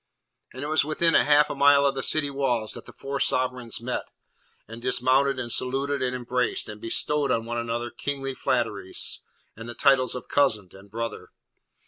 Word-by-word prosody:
And 130 - -7
it - - -3
was 155 0 +3
within 160 +3 +1
half 150 0 +4
a - - -4
mile 140 0 +5
of 140 - +2
the 135 - -3
city 145 +1 +2
walls 125 -6 -1
that - - -10
the - - -10
four 140 0 -5
sovereigns 125 -3 0
met, 125 +2 -4 0.6
and 115 +2 -10
dismounted 130 +2 +2
and 120 -2 -4
saluted 135 +4 -1
and 125 0 -1
embraced, 125 0 -1
and 105 0 -9
bestowed 145 +5 0
on 115 0 0
one 120 +1 -3
another 120 +1 -3
kingly 135 -1 -4
flatteries, - - -1 0.4
and 115 +2 -9
the 120 - -6
titles 135 -3 +3
of 125 - -7
Cousin 110 -10 +1
and 95 +1 -15
Brother. 115 +1 -5
130 Hz, 180 wpm, -25 LUFS, 120-140 Hz, 0.6 s, mile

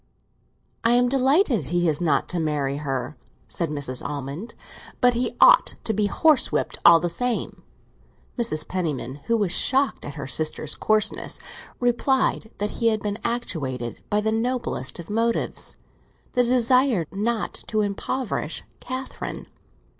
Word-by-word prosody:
"I 230 - +4
am 245 0 +4
delighted 270 - +3
he 175 +4 +1
is 155 0 0
not 165 -3 +2
to 180 - 0
marry 145 -3 -1
her," 135 -1 -3 0.3
said 170 -3 -2
Mrs. 140 -4 -4
Almond, 145 - -5 0.4
"but 245 0 +5
he 240 +1 -1
ought - - +6
to 220 - 0
be 210 0 +1
horsewhipped 305 +6 +2
all 170 -1 +8
the 175 - -1
same." 245 +8 -2 0.7
Mrs. 225 -11 -2
Penniman, 150 -7 -3
who 230 - +2
was 200 -5 0
shocked 270 +7 +2
at 145 - -7
her 140 - -5
sister's 155 +2 -2
coarseness, 215 0 0 0.4
replied 245 -1 +1
that 205 +1 -1
he 230 - +4
had 220 -2 +1
been 205 0 -2
actuated 135 - -3
by 210 0 +2
the 220 +1 0
noblest 235 - -1
of 170 - -8
motives—the 230 +2 -2
desire 250 -4 +3
not 215 +3 -1
to 215 -1 +1
impoverish 210 +5 -2 0.2
Catherine. 260 +1 -6
210 Hz, 140 wpm, -24 LUFS, 155-245 Hz, 0.7 s, all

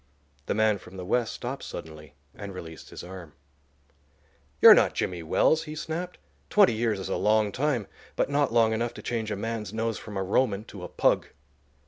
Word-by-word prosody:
The - - 0
man 110 -1 +2
from 95 - -13
the 90 - -6
West 120 +4 +1
stopped 130 +3 -5
suddenly 75 -3 -9 0.2
and 100 -2 -8
released 80 -3 -9
his - - -9
arm. 90 -4 -10 1.3
"You're - - +11
not - - +3
Jimmy 90 -2 -2
Wells," 160 - +2
he 155 0 -7
snapped. 170 +3 -5 0.3
"Twenty 205 - +5
years 110 -2 0
is 95 - -5
a - - 0
long 105 -1 +2
time, 130 -4 0 0.3
but - - +1
not 140 0 +1
long 115 -1 +4
enough 115 +1 -2
to - - -9
change 115 -2 -2
a 105 - -2
man's 110 -1 -4
nose 115 0 -2
from 105 -2 -8
a 95 - 0
Roman 105 +1 +1
to 105 -4 -11
a - - -4
pug." - - +1
110 Hz, 190 wpm, -27 LUFS, 95-120 Hz, 1.3 s, You're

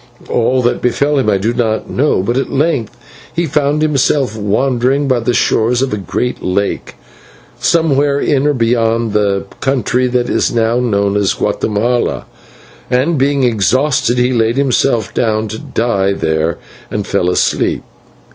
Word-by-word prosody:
"All 125 +2 +1
that 120 - 0
befell 140 +4 +1
him 125 - +1
I 100 - +2
do 110 +5 -1
not 115 -3 -1
know, 135 -8 0
but 120 +5 -1
at 135 - -1
length 140 -6 -1 0.3
he 170 - -1
found 150 0 0
himself 140 -5 +1
wandering 125 +6 0
by 130 -2 +2
the 120 +1 -1
shores 120 +3 +2
of 135 - -2
a - - -1
great 125 +5 -3
lake, 100 +2 -2 0.6
somewhere 145 -4 +2
in 145 -1 +1
or 150 - +2
beyond 115 -2 +1
the 100 -2 0
country 130 -1 0
that 125 -1 0
is - - 0
now 115 +1 +1
known 100 -4 0
as 100 -2 +1
Guatemala, 110 +3 -1 0.6
and, 135 +5 +1
being 140 0 +1
exhausted, 125 +3 +1
he 125 +1 +2
laid 115 +1 +1
himself 130 -5 +1
down 110 -2 0
to 110 +2 -6
die 100 -4 -1
there 80 -2 -1 0.3
and 105 -1 -3
fell 90 -3 0
asleep. 90 - 0
120 Hz, 155 wpm, -14 LUFS, 110-135 Hz, 0.6 s, I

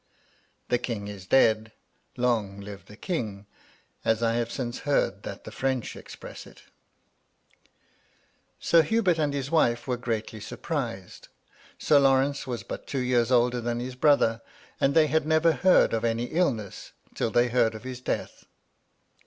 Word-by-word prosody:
The 125 - +2
king 105 -5 -4
is 100 -3 -9
dead 110 -3 +3
— - - -44
" - - -36
Long 110 -5 0
live 100 0 -9
the 105 - -12
king 110 - -4 0.6
1" - - +3
as 115 - -6
I 115 0 +2
have 120 0 -1
since 120 -2 -4
heard 145 -1 0
that - - -8
the - - -9
French 130 -3 -2
express - - -10
it - - -17 2.0
Sir 170 - +5
Hubert 180 -1 +1
and 150 -2 +1
his 140 -1 -4
wife 120 -8 +2
were 125 -1 -1
greatly 115 -2 -3
surprised. 115 - -5 0.5
Sir 145 - +4
Lawrence 135 0 +2
was 120 -2 -4
but - - -7
two 140 - -4
years 125 -1 +1
older 120 0 +3
than 120 0 -2
his 125 +1 -5
brother; 125 -4 +3 0.4
and 140 +2 +2
they 160 -1 +6
had 155 0 0
never 160 +1 +4
heard 185 +4 +4
of 115 - 0
any 115 0 0
illness 125 - -2 0.2
till - - -1
they 120 +2 +2
heard 115 -2 +2
of 110 - -9
his 130 -1 -7
death. - - -4
125 Hz, 165 wpm, -27 LUFS, 115-140 Hz, 2.0 s, they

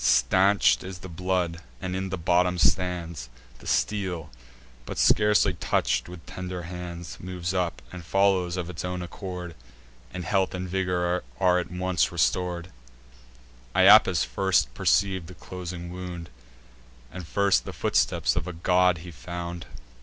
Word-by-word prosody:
Stanch'd 95 -10 +4
is 95 0 -7
the - - -5
blood, 90 -1 -1 0.2
and 90 +5 -4
in 95 0 -2
the 95 - -3
bottom 90 +1 +2
stands: 85 -6 0 0.3
The - - -12
steel, 90 -7 -1 0.5
but - - -7
scarcely 105 0 +4
touch'd - - 0
with 90 -2 -11
tender 90 -1 -6
hands, 85 -1 -7
Moves 90 0 -4
up, 90 -2 -1
and 90 -2 -8
follows 95 -1 +2
of 90 -2 -3
its 90 -3 -6
own 90 0 -3
accord, 90 -1 -7 0.6
And 90 -1 -6
health 95 -1 +1
and 90 0 -4
vigour 90 -1 0 0.2
are 90 -1 +4
at 85 - -4
once 90 0 0
restor'd. 90 -1 0 1.0
Iapis 95 -3 +7
first 95 -11 +1
perceiv'd 95 +5 +1
the 90 - -11
closing 90 -1 -7
wound, 90 -3 -7 0.8
And 90 +2 -8
first 100 +2 +2
the - - -5
footsteps - - +1
of - - -2
a 90 - -4
god 90 +1 +3
he 90 - -8
found. 85 +1 -6
90 Hz, 145 wpm, -26 LUFS, 85-95 Hz, 1.0 s, Iapis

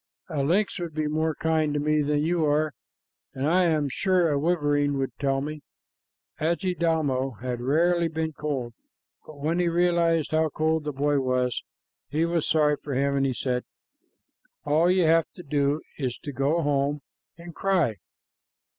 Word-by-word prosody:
A 155 -4 -1
lynx 185 +8 +1
would 170 -3 -5
be 155 -1 0
more 155 +1 0
kind 155 -2 0
to - - +1
me 150 +1 +2
than 145 0 +1
you 170 0 +1
are, 150 0 +1 0.6
and 135 +2 -1
I 180 +3 +3
am 155 -4 +1
sure 180 +3 +1
a 140 - +1
wolverine 145 -3 +1
would 135 -1 -1
tell 135 -1 +1
me." 150 +1 -5 0.8
Adjidaumo 160 - 0
had 125 -1 -4
rarely 170 +6 +2
been 160 0 -3
cold, 135 -6 -3 0.5
but 155 - -11
when 160 +4 0
he 175 - +2
realized 170 -2 +2
how 160 0 +2
cold 155 +1 0
the 150 - -1
boy 145 +1 +1
was, 130 -2 0 0.5
he 155 +4 +1
was 170 -2 0
sorry 150 -2 +3
for 140 -3 -4
him, 140 +1 +1
and 135 0 +2
he 130 - -1
said, 125 -1 -1 1.0
"All 160 +4 +3
you 185 0 +3
have 165 0 +4
to 180 - -10
do 145 0 0 0.2
is 130 -4 -2
to 145 - -5
go 140 +6 0
home 145 0 0 0.3
and 170 0 -10
cry. 170 - +1
150 Hz, 170 wpm, -26 LUFS, 140-165 Hz, 1.0 s, have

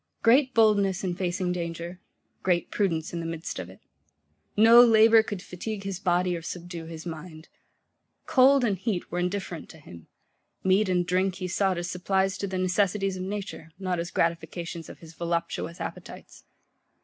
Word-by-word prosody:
Great 255 +3 +5
boldness 205 -4 +3
in 180 -2 -1
facing 180 0 -2
danger; 170 0 -5 0.4
great 175 -3 0
prudence 165 -6 -1
in 170 - -3
the 165 - -4
midst 165 0 -5
of - - -6
it. - - -14 0.8
No 230 +3 +9
labour 225 -1 +6
could 205 -4 -6
fatigue 200 +3 -6
his 195 -2 -4
body 180 -1 +1
or 170 - -5
subdue 170 0 -7
his 160 0 -9
mind. 160 -1 -8 0.8
Cold 275 -2 +5
and 205 -6 0
heat 195 -3 -3
were 175 - -2
indifferent 180 -2 -3
to - - -12
him: 85 - -13 0.6
meat 190 +2 +3
and 180 -1 +1
drink 185 +1 +1
he 185 -1 -4
sought 190 0 +1
as 175 0 -3
supplies 190 +1 0
to 200 - -2
the 185 -1 -3
necessities 195 +1 +1
of 185 - -5
nature, 195 -4 -5
not 185 -2 -2
as 170 +1 -3
gratifications 170 0 -2
of - - -10
his 165 -1 -14
voluptuous 170 0 -3
appetites. - - -9
180 Hz, 170 wpm, -27 LUFS, 170-200 Hz, 0.8 s, No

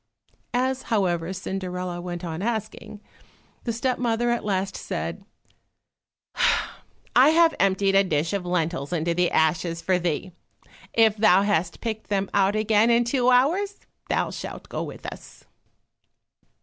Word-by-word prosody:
As, 260 +1 0
however, 180 -5 0
Cinderella 185 -2 -4
went 175 0 -5
on 165 +1 -5
asking, 215 -1 -4 0.6
the 235 - 0
step 245 +3 -1
mother 240 0 +1
at 240 - -1
last 195 -1 -1
said, - - -5 1.9
"I 260 +4 +7
have 330 0 +5
emptied 195 0 +2
a 195 0 +5
dish 160 -1 -1
of 200 -2 -1
lentils 165 -5 -2
into 170 0 0
the 175 +1 +2
ashes 165 +1 +1
for 185 +1 +1
thee, 175 +1 -2 0.6
if 220 -2 +3
thou 200 -3 +5
hast 185 -4 0
picked 220 -2 -4
them 200 -1 -1
out 200 +1 +3
again 215 +1 +3
in 235 0 +4
two 245 +1 +1
hours, 340 +12 +2 0.3
thou - - 0
shalt - - -8
go - - -3
with - - -8
us." - - -10
195 Hz, 140 wpm, -24 LUFS, 180-235 Hz, 1.9 s, I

